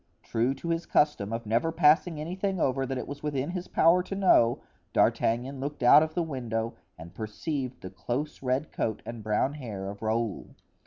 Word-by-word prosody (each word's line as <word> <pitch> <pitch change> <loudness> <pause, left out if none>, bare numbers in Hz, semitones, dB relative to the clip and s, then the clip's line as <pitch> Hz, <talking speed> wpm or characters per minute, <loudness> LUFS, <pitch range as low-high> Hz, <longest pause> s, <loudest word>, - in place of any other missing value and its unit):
True 120 +4 0
to 170 - -6
his 165 0 -1
custom 130 -9 +2
of 115 0 -4
never 115 +9 +1
passing 160 +1 +3
anything 185 +4 -2
over 135 -2 +1
that 135 0 -3
it - - -5
was 145 +1 -7
within 145 0 -2
his 180 -1 -5
power 170 +3 +4
to 190 +2 -6
know, 150 -12 +4 0.3
D'Artagnan 125 +4 +1
looked 145 0 -4
out 140 +5 +8
of 160 0 -2
the 175 - +1
window 115 -7 -3 0.2
and 85 +2 -11
perceived 125 - -4
the 95 - -8
close 120 +10 -4
red 130 +3 -1
coat 110 -2 -2
and 115 -1 -7
brown 110 +6 0
hair 110 -9 -6
of 100 - -12
Raoul. 110 -1 -2
135 Hz, 190 wpm, -28 LUFS, 115-155 Hz, 0.3 s, out